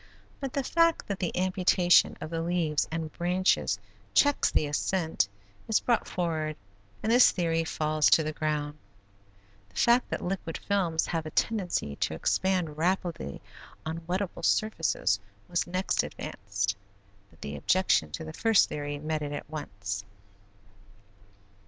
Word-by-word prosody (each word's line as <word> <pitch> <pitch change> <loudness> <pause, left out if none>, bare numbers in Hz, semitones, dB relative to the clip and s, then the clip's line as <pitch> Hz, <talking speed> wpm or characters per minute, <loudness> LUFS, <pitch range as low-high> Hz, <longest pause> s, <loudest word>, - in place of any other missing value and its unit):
But 270 -2 -4
the 275 - 0
fact 335 +4 +2
that 200 -2 -3
the 175 -2 -2
amputation 185 -1 +4
of 155 - -6
the 165 0 -1
leaves 165 -3 0
and 160 -1 -4
branches 180 +2 +1 0.4
checks 285 0 +4
the - - +2
ascent 160 - 0 0.4
is 220 - +3
brought 235 -2 +1
forward 160 -3 -2 0.5
and 220 - +1
this 245 +1 +7
theory 165 -2 0
falls 155 -1 +1
to 160 - +5
the 155 0 -3
ground. 150 -1 -2 0.9
The - - -27
fact 240 +1 +3
that - - -3
liquid 180 -3 -3
films 180 -6 0
have 165 -2 -2
a - - -4
tendency 180 - -1
to - - -1
expand 180 -5 0
rapidly 175 - -1 0.4
on 160 +1 -3
wetable 185 +1 -2
surfaces 165 - +1 0.3
was 175 0 -1
next 185 +2 0
advanced, 100 +2 -3 0.5
but 80 - -24
the 70 +1 -5
objection 185 - +2
to 165 - -4
the 160 0 -7
first 225 +3 +4
theory 145 0 -4
met 155 +1 -2
it 145 0 -4
at - - -5
once. 100 -9 -5
165 Hz, 145 wpm, -28 LUFS, 150-185 Hz, 0.9 s, this